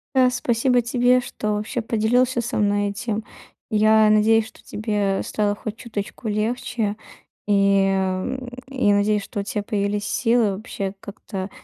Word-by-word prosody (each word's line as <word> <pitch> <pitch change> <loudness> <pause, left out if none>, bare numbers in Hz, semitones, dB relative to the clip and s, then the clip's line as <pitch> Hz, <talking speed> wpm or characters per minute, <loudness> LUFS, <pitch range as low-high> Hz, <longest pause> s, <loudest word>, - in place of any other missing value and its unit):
Да. 255 -1 +6
Спасибо 245 0 +1
тебе, 245 +1 +3
что 215 -3 -3
вообще 210 +4 -2
поделился 240 +3 +1
со 235 - -3
мной 205 -1 +2
этим. 215 +2 -3 0.5
Я 215 0 +5
надеюсь, 220 +1 +4
что - - -19
тебе 205 -3 -1
стало 205 -1 0
хоть 210 +1 -6
чуточку 220 -1 -6
легче. 215 0 -1 0.5
И, 200 -1 +3
а, 190 -1 0
м, 260 -2 -5 0.2
я 255 -7 +2
надеюсь, 205 +1 +2
что 200 +1 -5
у - - -1
тя 210 0 -3
появились 205 0 -1
силы 230 -4 +2
вообще 195 -2 -5
как-то, 195 -1 -7
215 Hz, 150 wpm, -22 LUFS, 205-235 Hz, 0.5 s, Да